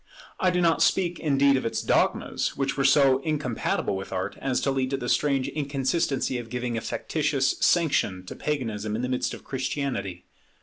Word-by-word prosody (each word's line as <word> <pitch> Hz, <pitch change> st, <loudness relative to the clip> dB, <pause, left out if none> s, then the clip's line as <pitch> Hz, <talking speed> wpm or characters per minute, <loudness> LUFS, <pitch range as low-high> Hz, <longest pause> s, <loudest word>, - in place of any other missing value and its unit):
I 185 Hz, -, +3 dB
do 180 Hz, 0 st, +1 dB
not 165 Hz, -1 st, +3 dB
speak, 175 Hz, -2 st, +2 dB
indeed, 140 Hz, -2 st, +3 dB
of -, -, -2 dB
its 115 Hz, -, -2 dB
dogmas; -, -, 0 dB
which 135 Hz, -1 st, -1 dB
were 140 Hz, -, 0 dB
so 135 Hz, -1 st, +5 dB
incompatible 140 Hz, -9 st, -1 dB
with 95 Hz, 0 st, -6 dB
Art, 95 Hz, +1 st, -3 dB
as 130 Hz, -2 st, 0 dB
to 140 Hz, -, +1 dB
lead 130 Hz, -1 st, 0 dB
to 135 Hz, -, -1 dB
the 125 Hz, -, -5 dB
strange 140 Hz, 0 st, +1 dB
inconsistency 140 Hz, -2 st, -1 dB
of 115 Hz, -1 st, -8 dB
giving 125 Hz, 0 st, -3 dB
a 115 Hz, -, -2 dB
factitious 145 Hz, -4 st, 0 dB
sanction 140 Hz, -, +2 dB
to -, -, -8 dB
Paganism 110 Hz, -8 st, -3 dB
in 115 Hz, -, -2 dB
the 125 Hz, -, -1 dB
midst 125 Hz, -1 st, -1 dB
of -, -, -14 dB
Christianity. 130 Hz, -9 st, -3 dB
135 Hz, 185 wpm, -26 LUFS, 120-145 Hz, -, so